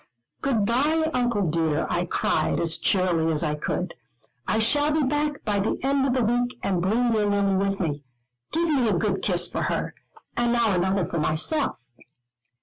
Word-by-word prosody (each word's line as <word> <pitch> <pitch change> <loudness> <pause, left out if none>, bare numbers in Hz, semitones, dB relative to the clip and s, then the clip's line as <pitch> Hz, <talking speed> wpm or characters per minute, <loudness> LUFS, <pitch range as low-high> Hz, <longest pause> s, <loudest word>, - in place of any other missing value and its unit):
"Good 235 -7 +1
bye, 305 +8 +1
Uncle 240 -6 0
dear," 160 -1 0
I 175 0 -1
cried, - - 0
as 165 -1 0
cheerily 175 -4 +1
as 155 0 +1
I 150 -2 0
could, 175 +4 -3 0.5
"I 220 - +1
shall 290 +7 +3
be 305 0 +1
back 295 +1 -1
by 205 -2 0
the 200 - -1
end 275 0 +2
of 255 - +1
the 255 - +2
week 245 +2 0
and 185 -3 0
bring 230 +6 +1
your 210 -2 +1
Lily 200 -1 +1
with 195 +1 0
me. 150 -5 -2 0.5
Give 335 +1 +1
me 260 -7 +2
a - - +2
good 195 0 -1
kiss 175 -2 +2
for - - -4
her, - - -2 0.4
and 240 0 +1
now 230 -4 +2
another 190 +2 +1
for 170 - -3
myself." 160 - 0
210 Hz, 185 wpm, -24 LUFS, 175-255 Hz, 0.5 s, shall